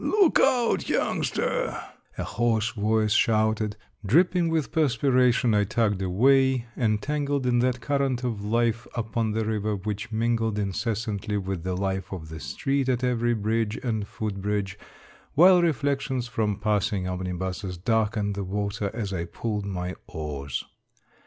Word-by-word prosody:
Look 395 -6 +4
out, 240 -2 +2
youngster," - - 0 0.4
a - - -2
hoarse 115 0 0
voice 110 -1 +1
shouted; 110 -1 +2 0.3
dripping 170 - +3
with 160 -3 0
perspiration 125 -5 +3
I 105 -1 +4
tugged 105 -1 0
away, 130 +6 +3
entangled 140 +5 0
in 120 -1 +3
that 125 0 +1
current 135 -2 0
of 115 -5 -2
life 115 +1 0
upon 110 -1 -1
the 110 0 0
river 105 -1 -1
which 105 +3 -4
mingled 115 -1 0
incessantly 105 0 -2
with 95 -3 -3
the 90 0 -2
life 95 0 -2
of 80 -5 -6
the 80 0 -7
street 135 - -1
at 125 0 0
every 120 -1 +1
bridge 110 +1 0
and 110 -5 -1
foot 105 -2 -4
bridge, 100 -1 -1 0.6
while 180 +3 +7
reflections 140 -5 0
from 110 -4 -1
passing 105 -2 0
omnibuses 90 +1 -4
darkened 105 +1 0
the 100 0 -3
water 100 +2 -2
as 105 -4 -3
I 85 -2 -2
pulled 105 +3 -3
my 90 -2 -3
oars. 70 -4 -4
110 Hz, 140 wpm, -26 LUFS, 100-125 Hz, 0.6 s, while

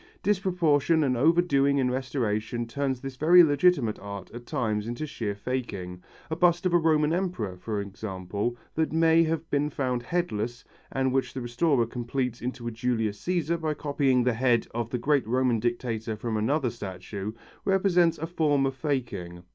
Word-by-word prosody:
Disproportion 170 -6 +2
and 130 -3 +1
overdoing 140 -1 +3
in 130 -2 +2
restoration 120 -3 -2
turns 135 +1 -2
this 135 -1 -7
very 175 +5 +7
legitimate 145 -6 +3
art 100 -1 -8
at 120 0 -10
times 110 -7 -1
into 120 +6 -3
sheer 110 -8 -4
faking. 100 -6 -4 0.3
A - - 0
bust 175 +2 +3
of 180 - +2
a 175 - +6
Roman 155 -1 +3
emperor, 170 - -2
for 105 +3 -4
example, 100 +3 -4 0.2
that 160 0 0
may 165 +1 +4
have 160 0 -2
been 145 +1 +1
found 130 -4 -1
headless 120 -6 -2 0.3
and 130 -1 0
which 130 -1 -1
the 130 - -3
restorer 120 +1 +1
completes 120 +1 -3
into 125 0 -5
a - - -2
Julius 110 -2 -1
Cæsar 170 -2 0
by 155 -1 -1
copying 140 -4 +1
the 125 0 +2
head 120 0 +2
of 115 -1 -2
the 125 - -1
great 140 0 +1
Roman 125 -1 +2
dictator 115 -1 -2
from 110 +1 -3
another 125 +4 +1
statue, 100 0 -6 0.3
represents 180 -3 +3
a 160 - -3
form 150 -5 +1
of 135 - 0
faking. 120 - -3
130 Hz, 170 wpm, -27 LUFS, 115-155 Hz, 0.3 s, very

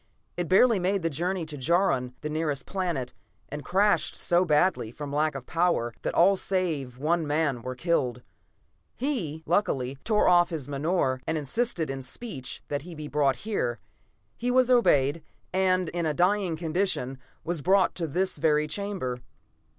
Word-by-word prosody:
It 175 -1 -2
barely 210 +3 +5
made 190 +1 0
the 165 - 0
journey 175 +4 -2
to 155 -1 -7
Jaron, 130 -5 +1
the 150 - -3
nearest 150 -3 -2
planet, 170 -10 -3 0.4
and 150 0 -6
crashed 200 +3 +2
so 175 0 +2
badly, 155 -6 +2
from 140 +4 -7
lack 150 0 +1
of 135 -2 -6
power, 165 -9 +1
that - - -3
all 190 +4 +5
save 165 -10 -1
one 160 +3 0
man 145 -4 0
were 130 +2 -5
killed. 125 -5 0 0.7
"He, 195 - -3
luckily, 140 -8 0
tore 215 -1 +2
off 175 -1 +5
his 155 -7 -4
menore, 140 -2 0
and 160 - 0
insisted 160 - -1
in 135 0 -5
speech 135 - -6
that 145 -1 -2
he 170 +3 -10
be 155 -1 -6
brought 145 -2 +2
here. 125 - -1 0.6
He 245 - -2
was 255 0 +3
obeyed, 145 - +4 0.3
and, 185 -2 +2
in 170 -2 -2
a 150 - -1
dying 185 0 +2
condition, 160 -6 -1 0.2
was 170 -2 -3
brought 190 +4 +3
to 170 -3 -3
this 180 +2 -1
very 150 0 +3
chamber." 185 -10 -3
165 Hz, 165 wpm, -27 LUFS, 140-185 Hz, 0.7 s, barely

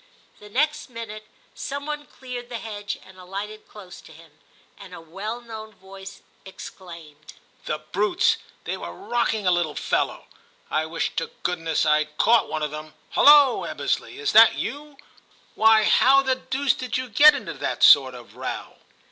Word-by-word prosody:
The 210 - -14
next 295 +6 -1
minute 220 -3 -9 0.3
some 280 +1 -6
one 295 -1 -5
cleared 245 -2 -9
the 240 - -5
hedge 205 -2 -6
and 190 0 -16
alighted 200 +4 -8
close 190 -4 -13
to - - -16
him, 160 0 -17 0.5
and 190 -3 -11
a - - -10
well 195 +9 -7
known 220 -2 -10
voice 195 +1 -12 0.2
exclaimed, 165 -6 -12 0.3
'The 155 - -2
brutes! 205 +2 +1 0.3
they - - -4
were 85 - -7
rocking 225 - -2
a 180 - +4
little 175 -4 0
fellow; - - -2 0.5
I 155 +1 0
wish 165 +1 -3
to 165 - -2
good 180 0 -1
ness 165 -1 -1
rd 150 0 +1
caught 235 +1 +3
one 155 -1 -3
of 150 - -2
them. 155 0 -9 0.2
Hullo! 290 -3 +6
Eb - - -7
besley, - - -2
is 430 -1 -1
that - - +7
you? 290 0 -6 0.6
Why, 220 0 +5
how 275 +5 +5
the 265 -1 +1
deuce 260 0 -1
did 250 -1 -4
you 255 0 -4
get 290 +6 +7
into - - -6
this - - +1
sort - - +6
of - - -14
row - - -6
210 Hz, 175 wpm, -23 LUFS, 175-250 Hz, 0.6 s, that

